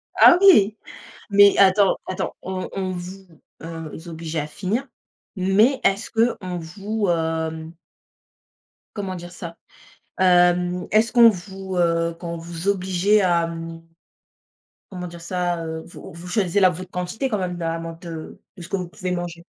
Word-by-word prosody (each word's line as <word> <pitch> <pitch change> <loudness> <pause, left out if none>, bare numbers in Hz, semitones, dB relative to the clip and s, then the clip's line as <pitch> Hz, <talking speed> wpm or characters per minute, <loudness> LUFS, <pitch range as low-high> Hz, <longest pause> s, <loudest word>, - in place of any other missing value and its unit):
Ah 345 - +8
oui, 220 - +6 0.5
mais 200 0 +6
attends 195 0 +5
attends. 185 - -3
On 185 0 -4
on 190 -1 -3
vous, 185 +2 -7 0.4
heu, 165 0 -8
obligeait 165 -1 -4
à 150 - -4
finir, 210 - -3 0.5
mais 205 +8 +3
est-ce 195 +1 +1
qu'on 210 -6 0
vous, 200 +5 -3
hem 160 -1 -2 1.2
comment 195 -3 -4
dire 175 0 -9
ça? 170 -1 -8 0.6
Hem, 180 0 +3
est-ce 220 +2 +3
qu'on 235 -2 +8
vous, 190 -1 -7
heu, 170 -1 +1
quand 170 -1 -5
on - - -5
vous 170 +2 -6
obligeait 190 +1 +2
à, 170 -2 +2
mmh, 165 0 -7 1.1
comment 180 -2 -6
dire 170 0 -10
ça, 175 -1 -2
heu? 160 0 -5
Vous - - -11
vous 170 +2 -10
choisissez 195 -1 +1
la 185 - +7
votre 180 +1 -8
quantité 180 +9 -3
quand 215 -5 -1
même, 180 -2 -3
là, 165 -1 -2
amant 165 0 -6
de 165 -3 -8 0.2
de 175 - -10
ce 170 - -9
que 195 - -1
vous 180 -2 -5
pouvez 180 +1 -4
manger? 175 -1 -5
180 Hz, 160 wpm, -22 LUFS, 170-195 Hz, 1.2 s, Ah